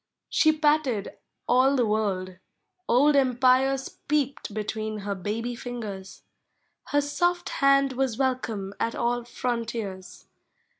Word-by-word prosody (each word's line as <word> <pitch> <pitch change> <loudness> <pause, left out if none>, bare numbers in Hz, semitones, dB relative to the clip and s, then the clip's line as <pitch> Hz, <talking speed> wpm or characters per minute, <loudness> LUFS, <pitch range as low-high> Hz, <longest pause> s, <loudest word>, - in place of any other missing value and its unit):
She 315 - +4
patted 300 -8 +1 0.3
all 260 +3 +4
the 245 -3 +2
world; 195 -4 -1 0.5
old 285 +5 +5
empires 265 0 +2
j>eeped 280 -6 0
Between 215 0 -4
her 200 0 -3
baby 220 +5 -3
Augers; 215 -6 -7 0.6
her 290 - +1
soft 350 +5 0
hand 275 -1 +3
Was 260 -3 -1
welcome 230 -7 -2
at 230 - -1
all 240 0 0
frontiers. 230 -6 -4
245 Hz, 110 wpm, -26 LUFS, 215-275 Hz, 0.6 s, old